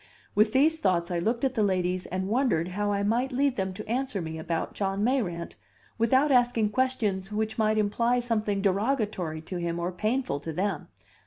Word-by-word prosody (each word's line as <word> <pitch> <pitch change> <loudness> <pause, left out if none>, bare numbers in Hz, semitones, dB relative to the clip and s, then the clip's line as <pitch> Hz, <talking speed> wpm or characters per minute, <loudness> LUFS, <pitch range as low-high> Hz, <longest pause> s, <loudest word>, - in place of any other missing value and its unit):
With 215 +1 +4
these 310 +6 +3
thoughts 175 - +1
I 175 - 0
looked 230 +8 -1
at 265 -1 +1
the 225 - 0
ladies 185 -2 0
and 185 +1 -3
wondered 215 -7 +1
how 205 +2 -1
I 200 0 0
might 240 +6 +1
lead 270 +1 +1
them 190 -1 -1
to 215 - -8
answer 245 -2 -1
me 160 -2 -5
about 165 +1 -3
John 195 0 -1
Mayrant, 205 -10 -1 0.4
without 260 +6 +3
asking 240 -4 +3
questions 215 -7 0
which 220 +1 -2
might 215 0 +2
imply 230 +4 +2
something 215 -4 -1
derogatory 200 - 0
to 180 - -5
him 170 0 -2
or 175 +1 -2
painful 215 - -1
to 160 +3 -5
them. 185 +1 -2
210 Hz, 185 wpm, -27 LUFS, 185-245 Hz, 0.4 s, With